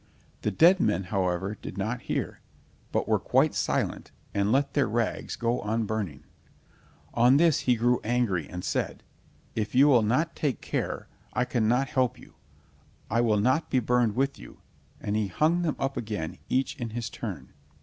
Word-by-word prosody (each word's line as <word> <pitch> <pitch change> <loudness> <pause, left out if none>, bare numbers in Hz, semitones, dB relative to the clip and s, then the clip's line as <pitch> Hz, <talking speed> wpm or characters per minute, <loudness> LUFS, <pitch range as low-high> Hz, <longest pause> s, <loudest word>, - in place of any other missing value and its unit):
The - - 0
dead 170 - +5
men, 95 - +1
however, 95 +1 -1
did 95 - -7
not 110 +5 -2
hear, - - -3 0.5
but - - 0
were - - +2
quite - - +2
silent, - - -1 0.2
and 100 +1 +1
let 140 +3 +2
their 140 -3 +2
rags 115 +1 -2
go 120 +1 0
on 110 +2 -1
burning. 100 -10 -3 0.9
On 125 +3 +5
this 165 -1 +4
he 125 - +2
grew 120 +2 +2
angry, 110 -9 0
and 90 0 -6
said: - - -2 0.5
"If 110 +1 -3
you 135 +3 +7
will 125 -5 +6
not 140 +10 +1
take 140 -7 -1
care, - - -3 0.3
I 125 0 +1
cannot 125 +2 +1
help 125 -1 +1
you, - - -16 0.8
I 115 +1 +3
will 110 -3 +2
not 130 +9 +1
be - - +1
burned 120 -2 +2
with 135 +2 0
you, - - -13 0.4
and 105 - -2
he 105 -1 +1
hung 155 - +2
them 160 -4 0
up 135 0 -2
again 105 -8 -4
each 130 +1 0
in 120 -4 -4
his 115 0 -4
turn. - - -7
120 Hz, 175 wpm, -27 LUFS, 105-130 Hz, 0.9 s, you